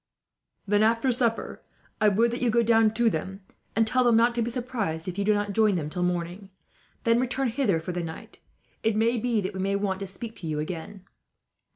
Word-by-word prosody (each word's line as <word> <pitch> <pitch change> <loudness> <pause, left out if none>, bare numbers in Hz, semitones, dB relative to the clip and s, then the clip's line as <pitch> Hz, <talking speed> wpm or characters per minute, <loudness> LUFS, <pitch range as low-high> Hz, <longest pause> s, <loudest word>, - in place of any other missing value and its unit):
"Then, 205 +1 +2
after 230 +4 +3
supper, 235 -2 -1 0.4
I 215 - +5
would 230 +4 +2
that 240 - -4
you 245 - +2
go 235 +1 +3
down 225 -1 +4
to 235 0 +2
them, 190 +1 -2 0.3
and 225 - +3
tell 255 +3 +2
them 235 -2 +4
not 235 +1 +4
to 235 - -1
be 230 - -1
surprised 230 -10 -3
if 185 +2 -4
you - - +1
do 210 +1 +3
not 205 0 -2
join 215 -1 +3
them 155 -3 -3
till 180 - -3
morning. 180 +2 -2 0.5
Then 230 0 +3
return 255 +1 0
hither 225 -8 +1
for 165 +3 -5
the 175 0 -3
night. 160 -1 -8 0.4
It 220 -1 +1
may 230 +2 +2
be 230 -2 0
that 190 +1 -4
we 190 - -6
may 195 +1 0
want 200 -1 -1
to 195 - -5
speak 220 +4 -8
to 170 - -7
you 155 -1 -2
again." 175 +5 -6
215 Hz, 225 wpm, -26 LUFS, 190-235 Hz, 0.5 s, I